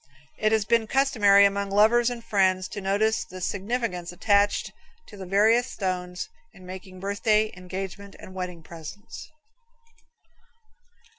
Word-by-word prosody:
It 215 0 +2
has 220 -2 +2
been 225 +1 +2
customary 210 -7 +5
among 200 0 0
lovers 225 +4 +4
and 240 -1 -6
friends 190 -4 +1
to 205 - -6
notice 205 +3 +1
the 185 - -10
significance 195 -2 -3
attached 200 +3 +1 0.3
to - - -13
the 190 -2 -8
various 220 +6 +3
stones 180 -2 -3 0.3
in 185 - -14
making 185 0 -9
birthday, 210 +2 +1
engagement 190 +2 -7
and 185 - -12
wedding 180 -3 -6
presents. 170 +7 -10
200 Hz, 130 wpm, -25 LUFS, 185-215 Hz, 0.3 s, customary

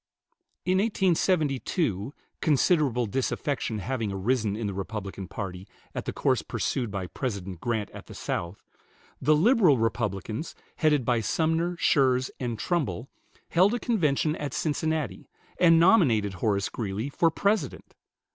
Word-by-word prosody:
In 185 +1 +2
1872 160 - 0 0.3
considerable 145 -5 +2
disaffection 130 +1 -2
having 115 0 -2
arisen 105 +2 0
in 110 0 -3
the 100 - -2
Republican 100 -1 -5
party 95 -2 -6 0.3
at - - -4
the - - -2
course - - +1
pursued 120 -4 -2
by 100 -2 -4
President 95 - -5
Grant 110 -3 -2
at - - -11
the - - -10
South, 85 +3 -4 0.6
the 155 +3 +4
"Liberal 185 - +5
Republicans," 110 - -2 0.2
headed 150 -5 +2
by 120 -1 +2
Sumner, 165 +8 0
Schurz, 130 -5 +2
and 120 -3 -3
Trumbull, 140 -2 -2 0.4
held 190 +7 +4
a - - -2
convention 155 - +1
at 145 -3 -4
Cincinnati, 155 -2 -2 0.3
and 165 -2 +6
nominated 135 - +4
Horace 100 +1 0
Greeley 105 +2 -3
for 165 +3 +2
President. 200 +6 -1
130 Hz, 130 wpm, -27 LUFS, 105-160 Hz, 0.6 s, and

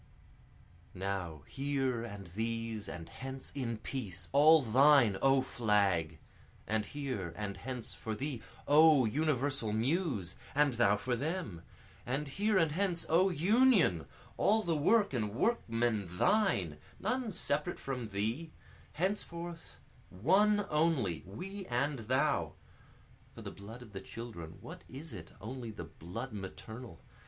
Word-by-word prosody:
Now 90 -6 -3
here 135 -3 -1
and 100 -4 -7
these 115 +2 -3
and 85 -1 -7
hence 135 0 -8
in 120 -5 -2
peace, 105 -6 -5
all 150 +2 +7
thine 130 -2 +5
O 135 -1 +4
Flag! 100 -10 +1 0.5
And 110 -1 -1
here 125 - -4
and 105 -2 -3
hence 125 +3 -5
for 110 -1 -5
thee, 135 -1 -4 0.3
O 150 -3 +7
universal 135 -2 +1
Muse! 115 - 0 0.2
and 145 -2 +4
thou 105 -3 +3
for 125 +4 -1
them! 145 - -3 0.4
And 140 +3 -2
here 205 +8 +1
and 165 -4 +3
hence 175 0 0
O 180 +4 +5
Union, 185 - +4 0.3
all 220 +2 +3
the 170 -2 0
work 200 +5 +3
and 110 -4 -1
workmen 115 - +1
thine! 100 - +2 0.2
None 250 -3 -1
separate 170 -2 0
from 125 -5 -4
thee 110 +11 -2 0.4
henceforth 170 -1 -3 0.3
One 200 - +3
only, 150 - +1
we 190 - -7
and 135 +3 0
thou, 130 +2 +1 0.8
(For - - -9
the - - -6
blood 110 +5 -10
of 110 -4 -15
the 95 - -5
children, 95 -9 -8
what - - -10
is 135 +3 -6
it, 85 -6 -8
only 120 +1 -6
the 105 - -7
blood 115 +10 -7
maternal? 105 +1 -8
130 Hz, 130 wpm, -33 LUFS, 105-160 Hz, 0.8 s, all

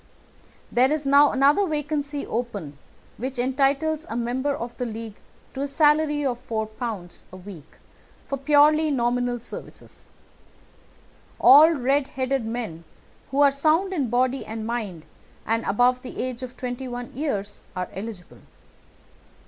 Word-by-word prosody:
there 255 +3 +3
is 305 -1 -1
now 280 +1 +6
another 285 +9 +3
vacancy 295 -2 -2
open 210 -11 -4 0.4
which 260 +2 -4
entitles 275 +5 +1
a - - -4
member 260 +4 -1
of 235 0 -6
the 250 - -2
League 225 -1 -7 0.4
to 270 - -5
a 285 - -1
salary 295 0 +2
of 245 -3 -1
£ 220 -1 -2
4 215 -6 -5 0.2
a 185 - -10
week 180 -5 -12 0.5
for 275 - -3
purely 300 +3 +4
nominal 245 -2 0
services. 230 - -10 1.3
All 295 +4 +9
red 275 0 +1
headed 260 -2 -2
men 225 -8 -5 0.5
who 275 +2 +1
are 285 -1 +6
sound 315 +7 +2
in 280 -9 -1
body 255 +3 +1
and 220 0 -6
mind 215 -9 -4 0.4
and 225 +1 0
above 245 +5 +2
the 255 - -9
age 255 -1 -3
of 255 -1 -8
twenty 250 +1 -5
one 245 0 -6
years, 210 -8 -3
are 180 -1 -2
eligible. 195 -2 -8
255 Hz, 140 wpm, -24 LUFS, 230-285 Hz, 1.3 s, All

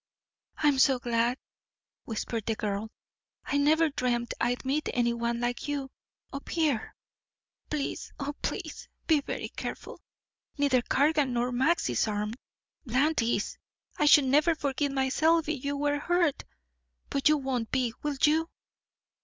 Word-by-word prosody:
"I'm 290 -3 +3
so 265 -1 +5
glad," 240 0 0 0.7
whispered 225 -1 -4
the 225 - +1
girl. 210 +1 -3 0.6
"I 285 - 0
never 310 +3 +4
dreamed 240 -3 -1
I'd 245 +2 0
meet 285 +3 0
any 240 -1 +2
one 235 0 -1
like 240 +4 -2
you 280 -2 -3 0.4
up 275 - -7
here. 305 -9 0 0.7
Please, 300 -2 -3
oh, 285 +1 -3
please, - - -4 0.2
be 310 -3 +3
very - - -5
careful. - - -7 0.6
Neither 280 -3 +3
Cargan 285 +1 +2
nor 245 +1 0
Max 270 +8 +2
is - - +1
armed. 210 +2 -2 0.5
Bland 275 +4 +2
is. 230 -3 -1 0.4
I 300 - +2
should 290 -1 +7
never 300 +5 +3
forgive 285 -1 -1
myself 305 +5 +2
if 300 -4 -3
you 285 0 -1
were 290 0 0
hurt. 345 -2 +1 0.7
But 275 +1 +3
you 305 - +4
won't 260 -5 -2
be 250 -3 0
will 295 -2 -2
you?" 320 +2 +4
275 Hz, 145 wpm, -28 LUFS, 240-295 Hz, 0.7 s, should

